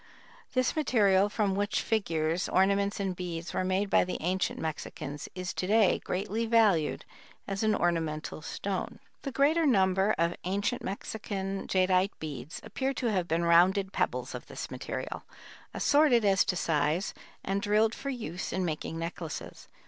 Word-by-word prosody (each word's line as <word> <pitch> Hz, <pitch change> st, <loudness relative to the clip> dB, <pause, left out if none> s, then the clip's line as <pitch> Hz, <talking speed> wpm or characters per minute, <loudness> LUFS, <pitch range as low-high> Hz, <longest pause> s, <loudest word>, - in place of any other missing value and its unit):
This 255 Hz, -1 st, +1 dB
material, 205 Hz, -9 st, +3 dB
from 205 Hz, -2 st, 0 dB
which 205 Hz, +2 st, 0 dB
figures, 170 Hz, -6 st, 0 dB
ornaments 200 Hz, +2 st, +2 dB
and 190 Hz, -2 st, -1 dB
beads 175 Hz, -1 st, -5 dB
were -, -, 0 dB
made 190 Hz, +2 st, +1 dB
by -, -, +5 dB
the 180 Hz, -, -3 dB
ancient 185 Hz, +3 st, -1 dB
Mexicans, 150 Hz, -2 st, -5 dB
is 185 Hz, 0 st, -4 dB
to 180 Hz, -, -2 dB
day 210 Hz, -2 st, +4 dB
greatly 210 Hz, +5 st, -2 dB
valued 215 Hz, -9 st, +3 dB, 0.4 s
as 195 Hz, 0 st, -3 dB
an 215 Hz, -1 st, +3 dB
ornamental 160 Hz, -4 st, -1 dB
stone. 190 Hz, +4 st, -4 dB, 0.2 s
The 275 Hz, -, -4 dB
greater 290 Hz, +6 st, +3 dB
number 195 Hz, -5 st, +3 dB
of 170 Hz, +1 st, +1 dB
ancient 200 Hz, +6 st, -1 dB
Mexican 195 Hz, -1 st, -4 dB
jadeite 185 Hz, +1 st, +2 dB
beads 150 Hz, 0 st, -6 dB
appear 270 Hz, 0 st, -2 dB
to 240 Hz, -3 st, 0 dB
have 185 Hz, -4 st, 0 dB
been 170 Hz, +1 st, 0 dB
rounded 185 Hz, +3 st, +4 dB
pebbles -, -, -1 dB
of -, -, -7 dB
this -, -, -7 dB
material, -, -, -5 dB, 0.5 s
assorted 285 Hz, -6 st, +4 dB
as 195 Hz, -1 st, +4 dB
to 190 Hz, -, 0 dB
size 160 Hz, +2 st, 0 dB, 0.3 s
and 195 Hz, +1 st, -1 dB
drilled 215 Hz, +2 st, +3 dB
for 275 Hz, -, -5 dB
use 205 Hz, -, -4 dB
in 185 Hz, 0 st, -1 dB
making 160 Hz, 0 st, -3 dB
necklaces. 165 Hz, -1 st, -6 dB
190 Hz, 155 wpm, -29 LUFS, 170-210 Hz, 0.5 s, by